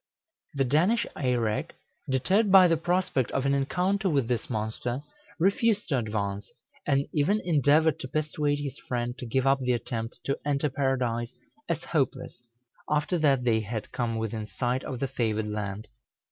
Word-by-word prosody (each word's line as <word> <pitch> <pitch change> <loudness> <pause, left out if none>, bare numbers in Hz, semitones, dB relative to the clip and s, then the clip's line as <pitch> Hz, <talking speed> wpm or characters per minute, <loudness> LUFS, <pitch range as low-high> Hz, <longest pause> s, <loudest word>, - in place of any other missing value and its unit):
The 135 - +2
Danish 165 - +2
Eirek, 120 -6 0 0.4
deterred 190 - +2
by 190 -1 +9
the 165 - +3
prospect 170 - 0
of 135 - 0
an 140 - +3
encounter 185 +8 +1
with 140 -7 +1
this 120 -2 -2
monster, 120 +3 -3 0.3
refused 205 +4 +2
to 135 -4 +2
advance, 100 -3 -3 0.4
and 140 0 +2
even 160 +9 +2
endeavored 155 -1 +3
to - - -5
persuade 150 0 0
his 145 -2 -5
friend 120 -1 -2
to 125 - -6
give 130 +3 0
up 135 0 +4
the 125 -1 +1
attempt 115 -1 -4
to 140 - -1
enter 145 0 0
Paradise 125 -4 -1 0.4
as - - -1
hopeless, - - -2 0.5
after 150 +4 +1
that 140 -4 +3
they 115 -2 +3
had 110 0 -5
come 115 -2 -2
within 110 -1 -3
sight 125 +3 -1
of 130 - -4
the 135 - 0
favored 110 -4 -1
land. 105 0 -4
135 Hz, 160 wpm, -27 LUFS, 115-150 Hz, 0.5 s, by